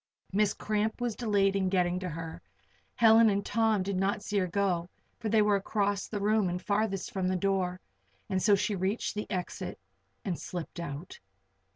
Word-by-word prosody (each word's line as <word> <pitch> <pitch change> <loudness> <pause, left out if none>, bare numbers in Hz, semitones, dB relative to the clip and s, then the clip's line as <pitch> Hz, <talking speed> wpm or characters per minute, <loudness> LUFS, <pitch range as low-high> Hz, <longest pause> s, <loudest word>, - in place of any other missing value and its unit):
Miss 210 +1 +2
Cramp 215 +2 -1
was 240 -3 -1
delayed 200 -4 +2
in 190 -1 +1
getting 180 -1 +1
to 185 -1 -4
her; 165 0 -6 0.5
Helen 225 0 +7
and 200 0 0
Tom 220 -3 +2
did 200 +1 -2
not 200 +2 0
see 205 -1 0
her 185 - 0
go, 180 -2 0 0.3
for 225 -2 -2
they 215 0 +4
were 210 -1 +3
across 200 0 -1
the 210 - -3
room 210 -1 +2
and 180 +1 -2
farthest 200 0 -1
from 190 -2 0
the 185 - +1
door. 185 -1 0 0.5
And 190 -1 0
so 205 +1 +5
she 210 +1 0
reached 200 +6 -1
the 210 -1 -4
exit 185 -1 -4 0.5
and 180 -4 -2
slipped 175 -1 -6
out. 160 +1 -6
195 Hz, 185 wpm, -30 LUFS, 185-210 Hz, 0.5 s, Helen